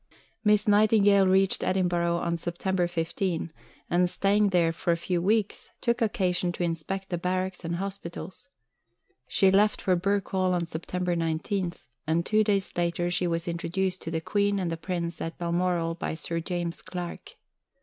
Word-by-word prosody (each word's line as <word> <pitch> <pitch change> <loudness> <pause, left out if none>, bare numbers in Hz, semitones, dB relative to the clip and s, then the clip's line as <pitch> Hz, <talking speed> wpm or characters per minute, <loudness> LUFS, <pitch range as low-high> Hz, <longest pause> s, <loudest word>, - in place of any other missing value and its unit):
Miss 210 -1 +3
Nightingale 205 -2 +5
reached 190 +1 +3
Edinburgh 175 -2 +1
on 170 0 -1
September 175 +2 -1
15, 170 0 -2 0.3
and, 180 +1 +2
staying 200 +2 +2
there 175 -3 +3
a 170 +1 0
few 175 +1 -1
days, 215 -2 0
took 235 0 0
occasion 185 -5 +1
to 175 - -3
inspect 175 +3 -3
the 175 -2 -2
barracks 185 +1 -2
and 170 +1 -2
hospitals. 190 +5 -6 0.8
She 190 +7 +4
left 210 +2 +3
for 185 - +2
Birk 195 +2 0
Hall 185 -1 +2
on 175 -1 0
September 175 +2 -2
19, 170 +3 -1 0.3
and 165 +2 +1
two 215 0 +3
days 200 -2 0
later 175 0 0
she 180 0 +1
was 170 +1 -1
introduced 180 +2 -2
to - - -5
the 165 -1 -2
Queen 205 +3 +1
and 180 -3 -1
the - - -1
Prince 170 0 -4
at 165 0 -4
Balmoral 170 -1 0
by 165 -1 -4
Sir 165 +1 -3
James 170 0 -3
Clark. 175 -1 -7
180 Hz, 160 wpm, -27 LUFS, 170-195 Hz, 0.8 s, Nightingale